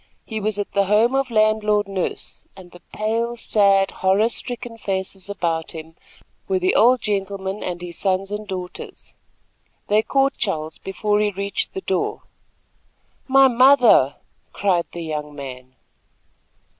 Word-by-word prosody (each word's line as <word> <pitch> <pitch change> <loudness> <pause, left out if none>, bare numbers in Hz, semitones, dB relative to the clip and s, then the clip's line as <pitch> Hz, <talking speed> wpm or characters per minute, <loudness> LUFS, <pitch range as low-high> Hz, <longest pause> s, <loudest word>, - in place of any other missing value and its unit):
He 220 -1 -4
was 215 0 -1
at 205 - -3
the 200 0 +2
home 215 +5 +3
of 270 -1 0
Landlord 215 -2 +2
Nurse, 195 -2 -4
and 180 -2 -13
the 175 - -15
pale, 230 +3 -2
sad, 200 -3 +3
horror 195 +4 +2
stricken 240 -1 -4
faces 190 -1 -3
about 165 -5 -2
him 160 0 -9 0.5
were 385 - +1
the 370 +1 +1
old 245 +2 +5
gentleman 195 -1 -3
and 175 -1 -4
his 175 -1 -7
sons 195 0 0
and 210 0 -5
daughters. 185 -2 -8 0.8
They 210 +1 +4
caught 270 +4 +1
Charles 160 -7 -3
before 205 +2 -1
he 210 0 +2
reached 200 0 -3
the 190 - -3
door. 190 -1 -2 1.0
"My 270 0 +6
mother!" 250 - +5 0.4
cried 185 -4 +1
the 170 - -6
young 150 -2 -5
man. 130 -2 -9
200 Hz, 145 wpm, -21 LUFS, 185-220 Hz, 1.0 s, My